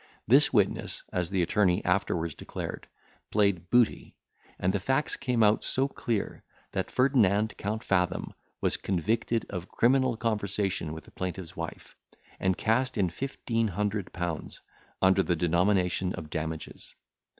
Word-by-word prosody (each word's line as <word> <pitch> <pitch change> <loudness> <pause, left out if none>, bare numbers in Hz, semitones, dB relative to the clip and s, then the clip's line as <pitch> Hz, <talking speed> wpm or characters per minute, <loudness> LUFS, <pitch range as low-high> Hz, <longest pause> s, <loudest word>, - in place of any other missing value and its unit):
This 140 +6 +6
witness, 105 -5 +1
as 90 -2 0
the 95 -2 +1
attorney 90 0 +2
afterwards 90 -3 0
declared, - - -6 0.4
played 100 -5 +1
booty, 120 -2 +2 0.4
and 90 +1 +1
the 100 - +1
facts 135 +9 +1
came 125 -4 +1
out 105 +1 +4
so 135 +1 +1
clear, 115 -6 -3 0.3
that - - -2
Ferdinand 110 -6 +3
Count 110 +2 -3
Fathom 90 -2 0 0.3
was - - +1
convicted 110 +5 0
of 90 -2 -5
criminal 130 0 +3
conversation 100 -7 -1
with 80 0 -7
the - - -17
plaintiff's 90 -2 -5
wife, - - -7 0.4
and 95 -1 +1
cast 125 +3 +1
in 95 -4 +1
fifteen 115 -1 -2
hundred 105 0 -2
pounds, 85 -2 -4 0.4
under 95 +1 +5
the 90 -2 +1
denomination 90 +2 +2
of 75 -1 -8
damages. 80 0 -5
100 Hz, 140 wpm, -28 LUFS, 90-115 Hz, 0.4 s, This